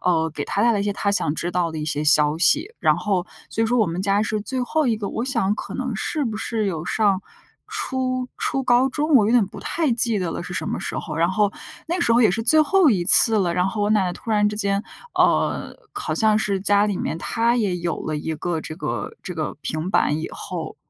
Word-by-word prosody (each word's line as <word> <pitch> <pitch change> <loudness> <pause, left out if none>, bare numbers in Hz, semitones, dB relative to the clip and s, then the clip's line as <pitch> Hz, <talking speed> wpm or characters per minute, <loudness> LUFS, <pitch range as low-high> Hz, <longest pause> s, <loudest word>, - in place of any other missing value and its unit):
呃， 160 -3 +1
给 - - -5
她 200 - -1
带 235 - +4
来 205 - 0
一 - - 0
些 205 0 -2
她 200 0 -1
想 150 -6 0
知 175 - -3
道 175 -2 0
的 160 - -6
一 150 - -3
些 150 0 -2
消 150 +1 +4
息， 315 - +4
然 - - +3
后 190 -4 -1 0.2
所 225 - -1
以 - - +2
说 245 +2 +1
我 215 - +3
们 170 +2 -3
家 200 +1 +1
是 215 0 -2
最 255 +4 -3
后 310 +3 0
一 225 -2 +1
个。 205 -2 -4
我 230 - -3
想 230 -7 0
可 - - -7
能 255 -3 -3
是 290 +7 -2
不 220 -3 -3
是 225 -1 -2
有 165 -5 -3
上 200 0 +1 0.5
初 260 -11 -2
初 270 - -1
高 245 +1 +3
中， 300 +3 -1
我 220 -6 +6
有 - - +1
点 235 -5 +4
不 - - -11
太 320 -5 -1
记 230 -2 +2
得 175 -3 -2
了， - - -5
是 180 - -8
什 - - -2
么 - - -3
时 - - -4
候。 155 - -6
然 170 +2 +2
后 205 +1 +1 0.4
那 345 +2 -2
时 230 - +2
候 240 - +4
也 215 - +5
是 225 +4 -2
最 310 +7 +4
后 315 0 +4
一 185 -5 +1
次 220 +4 +6
了， 175 -4 0
然 180 +1 +1
后 205 +2 -3
我 205 - +1
奶 210 -3 +3
奶 180 - -2
突 225 - -8
然 210 -1 +3
之 210 - -5
间， 200 -1 0 0.3
呃， - - +1 0.2
好 410 0 -3
像 215 -2 +3
是 200 -3 -1
家 205 +1 +3
里 200 -3 -2
面 - - -3
她 235 +5 0
也 200 -6 0
有 170 -1 -2
了 155 - -2
一 160 +1 -4
个 165 0 -3
这 155 0 -8
个 - - -4
这 180 - -6
个 155 -3 -4
平 155 +4 -3
板 150 -5 +2
以 - - -4
后 165 -4 -6
205 Hz, 280 characters per minute, -22 LUFS, 180-235 Hz, 0.5 s, 我